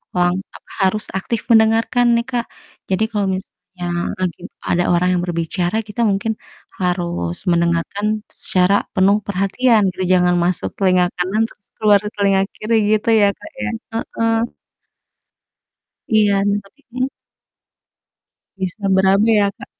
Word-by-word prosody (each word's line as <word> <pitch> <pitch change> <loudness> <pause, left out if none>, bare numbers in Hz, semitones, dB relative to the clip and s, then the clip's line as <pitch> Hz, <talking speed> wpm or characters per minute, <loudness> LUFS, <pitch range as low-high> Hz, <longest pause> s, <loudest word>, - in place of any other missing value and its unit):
lang 175 0 +2 0.2
apa, - - -15 0.2
harus 215 +3 -1
aktif 225 +3 -2
mendengarkan 225 +2 +4
nih, 235 - +1
Kak. 240 -1 -1 0.4
Jadi 190 +3 +1
kalau 205 -2 0
misalnya 185 -2 -9 0.3
lagi 185 -2 -2 0.3
ada 175 0 +2
orang 180 +1 +2
yang 180 - +1
berbicara, 175 +2 -2
kita 210 +3 -4
mungkin 205 +3 0 0.5
harus 170 - -1 0.2
mendengarkan 170 +4 0 0.4
secara 185 +1 +2 0.2
penuh 195 +2 +4
perhatian 205 +4 +2
gitu, 185 - -4
jangan 180 -1 +3
masuk 180 0 -1
telinga 185 -2 +4
kanan 185 +5 0
terus 200 - -22
keluar 210 -2 +5 0.2
telinga 195 -1 +2
kiri 225 +2 -1 0.2
gitu 215 +1 +1
ya, 205 - +5
Kak, - - -11
ya, 105 - -1 0.3
heeh. - - -9 1.9
Iya, 205 -3 +3 0.2
tapi 230 +9 -24
mmm? 255 +1 -1 1.5
Bisa 190 +2 -4
berabe 190 +3 +4
ya, 200 - +3
Kak. - - -12
195 Hz, 130 wpm, -19 LUFS, 180-215 Hz, 1.9 s, keluar